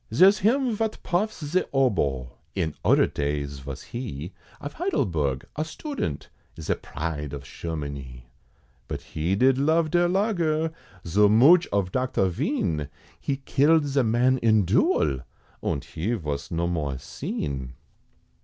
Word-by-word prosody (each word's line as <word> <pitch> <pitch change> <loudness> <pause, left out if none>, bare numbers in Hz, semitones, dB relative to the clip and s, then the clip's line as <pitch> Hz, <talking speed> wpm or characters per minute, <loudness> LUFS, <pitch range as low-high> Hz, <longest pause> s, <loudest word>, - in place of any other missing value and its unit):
Zare's 195 +2 +6
him 240 +3 +2
vot 220 0 -1
puffs 185 -2 -1
ze 175 +6 +2
oboe, 75 - +1 0.2
In 85 -6 -1
oder - - +5
days 70 -1 -3
vos 70 0 -7
he, 95 - -6 0.3
Of 145 - -6
Heidelberg, 80 - -1
a 155 - 0
student 160 - -4 0.3
Ze 80 - 0
pride 75 -1 -5
of 70 -1 -6
Shermanie, 70 -6 -6 0.6
But - - -4
he 85 +5 -2
did 130 +4 +4
love 160 +2 +2
der 175 0 +4
Lager, 170 -5 +1 0.3
Zoo 100 +5 +4
mooch 145 - +6
of 100 -2 0
Docter 125 -6 +1
Vien, 75 -3 -1 0.3
He 135 - -2
killed 150 +2 +4
ze 140 -1 +2
man 125 +3 +2
in 110 -4 +3
duel! 70 -5 +2 0.4
Und 70 - -1
he 100 +9 -2
vos 75 -9 -3
no 85 -1 -1
more 75 -6 -2
seen. 65 -1 -5
100 Hz, 135 wpm, -25 LUFS, -, 0.6 s, Zare's